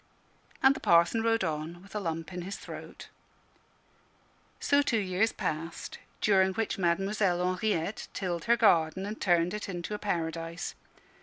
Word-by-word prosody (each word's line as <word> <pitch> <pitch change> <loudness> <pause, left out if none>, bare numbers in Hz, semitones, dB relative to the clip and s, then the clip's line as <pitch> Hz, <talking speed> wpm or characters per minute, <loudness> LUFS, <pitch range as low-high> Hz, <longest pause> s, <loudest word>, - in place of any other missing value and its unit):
And 265 +1 +7
the - - -5
Parson 170 +6 +4
rode 225 -2 +2
on 160 +1 -3
with 200 - -15
a 210 - -1
lump 165 -1 -4
in 180 - -4
his 195 +3 -5
throat. - - -9 1.5
So 285 0 +3
two 250 -5 +1
years 195 +2 +1
passed, 165 +2 -4 0.2
during 190 -2 +4
which 225 -2 -1
Mademoiselle 185 +1 +1
Henriette 200 0 -1
tilled 175 -3 -3
her 235 0 +4
garden 185 -3 +3
and 210 +2 -6
turned 175 -2 +3
it 210 -1 -4
into 175 +2 -4
a 210 - -3
paradise. 165 -3 -3
185 Hz, 150 wpm, -29 LUFS, 170-210 Hz, 1.5 s, And